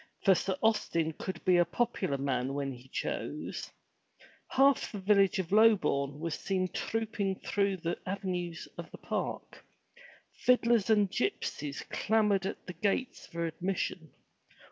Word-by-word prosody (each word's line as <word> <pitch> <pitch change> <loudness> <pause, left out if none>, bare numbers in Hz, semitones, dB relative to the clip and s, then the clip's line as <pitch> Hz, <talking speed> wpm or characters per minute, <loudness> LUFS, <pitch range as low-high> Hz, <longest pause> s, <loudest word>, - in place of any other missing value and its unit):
For 195 - +7
Sir 190 +1 -1
Austin 170 -7 +1
could 185 +2 -6
be 180 -1 +5
a 175 - +6
popular 185 -7 -1
man 135 -1 -1
when 140 -1 -2
he 125 0 -11
chose. - - -4 0.8
Half 275 +1 +3
the 210 - -5
village 200 0 +3
of 185 -2 -3
Lobourne 150 -10 +4
was 165 0 -2
seen 185 +2 -1
trooping 215 -4 -2
through 200 -1 0
the 170 0 -3
avenues 180 -3 -3
of - - -6
the - - -10
park. - - -4 0.7
Fiddlers 235 -4 +3
and 210 -2 +5
gypsies 150 - -2
clamored 210 -3 +2
at - - -6
the 180 - -6
gates 215 +6 -1
for 170 0 -3
admission. 170 -1 -3
190 Hz, 140 wpm, -31 LUFS, 165-210 Hz, 0.8 s, For